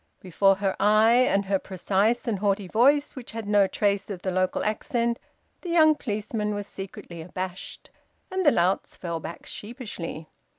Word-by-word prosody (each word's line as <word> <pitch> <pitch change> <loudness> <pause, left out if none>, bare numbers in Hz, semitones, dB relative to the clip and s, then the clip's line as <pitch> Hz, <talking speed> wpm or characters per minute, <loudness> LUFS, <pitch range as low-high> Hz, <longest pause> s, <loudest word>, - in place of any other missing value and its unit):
Before 195 +2 +3
her 195 0 -1
eye, 215 +3 +5 0.2
and 200 0 +1
her 195 0 +1
precise 200 +6 0
and 215 -4 0
haughty 200 -1 0
voice, 280 +9 +3
which 250 -4 -8
had 225 -2 -5
no 205 -1 +4
trace 200 0 0
of 185 -3 -6
the 185 - -1
local 185 0 0
accent, 235 +2 -1 0.4
the 355 - -6
young 315 -2 +6
policeman 210 -4 -3
was 205 0 -4
secretly 190 -4 -9
abashed, 185 +2 -7 0.4
and 375 0 0
the 295 - +6
louts 180 -1 +1
fell 170 -2 -4
back 165 +2 -8
sheepishly. 210 - -7
205 Hz, 165 wpm, -26 LUFS, 190-230 Hz, 0.4 s, young